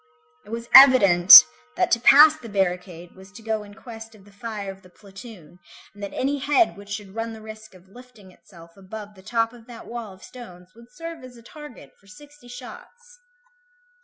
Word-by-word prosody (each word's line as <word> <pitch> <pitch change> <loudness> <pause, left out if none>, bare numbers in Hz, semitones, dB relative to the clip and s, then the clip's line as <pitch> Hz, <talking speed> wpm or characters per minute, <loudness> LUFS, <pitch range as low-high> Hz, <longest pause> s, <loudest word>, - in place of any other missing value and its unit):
It - - -18
was 230 +1 -8
evident, 200 - +8 0.3
that - - -2
to 235 - +1
pass 295 +5 +5
the 245 -7 -14
barricade 180 -3 -5
was 190 +1 -18
to 225 - -15
go 220 -1 -4
in 205 0 -16
quest 225 -1 -14
of 200 -2 -22
the 205 - -21
fire 205 -1 -9
of 195 0 -17
the 185 - -21
platoon, 195 -3 -16 0.3
and 205 - -17
that 200 - -8
any 280 +2 -4
head 295 +6 0
which 200 0 -16
should 200 -1 -9
run 225 +1 -7
the 220 - -12
risk 215 -2 -14
of 185 +1 -21
lifting 230 -3 -19
itself 170 -2 -20
above 205 +2 -12
the 190 - -19
top 230 +3 -3
of 235 -1 -19
that 235 -2 -14
wall 235 -3 -9
of 185 0 -19
stones 180 -7 -15
would 235 +1 -20
serve 330 +2 -11
as 250 -1 -15
a 230 - -18
target 255 - -15
for 195 - -28
sixty 290 +4 -18
shots. 485 - -15
220 Hz, 200 wpm, -21 LUFS, 195-245 Hz, 0.3 s, evident